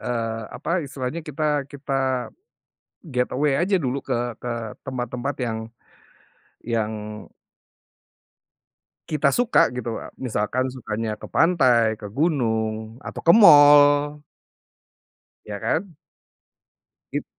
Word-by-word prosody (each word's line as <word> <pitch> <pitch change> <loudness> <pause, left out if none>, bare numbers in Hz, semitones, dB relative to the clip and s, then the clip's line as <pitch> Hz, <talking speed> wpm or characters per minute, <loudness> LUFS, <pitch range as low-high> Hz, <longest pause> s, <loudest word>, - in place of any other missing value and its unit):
Eee, 115 -2 -3
apa 170 +1 -2
istilahnya, 135 +3 -5
kita 150 -2 -2
kita, 135 -2 -2 0.8
get 125 -4 -1
away 140 +1 +1
aja 190 +4 +2
dulu 130 +1 -2
ke 120 -2 -2
ke 120 - -4 0.3
tempat-tempat 125 +1 -4
yang 110 -2 -3 1.1
yang 110 -2 -1 2.2
kita 150 -2 +1
suka 245 -1 +3
gitu 125 -1 -5
loh. - - -7 0.2
Misalkan 125 0 -1
sukanya 110 -2 -4
ke - - -8
pantai, 125 -10 +3
ke 105 - -7
gunung, 110 -6 -1
atau - - -6
ke 170 - +7
mall. 145 -6 +7 1.3
Iya 105 -1 -5
kan? 165 - -1 1.2
It - - -3
130 Hz, 105 wpm, -23 LUFS, 115-145 Hz, 2.2 s, ke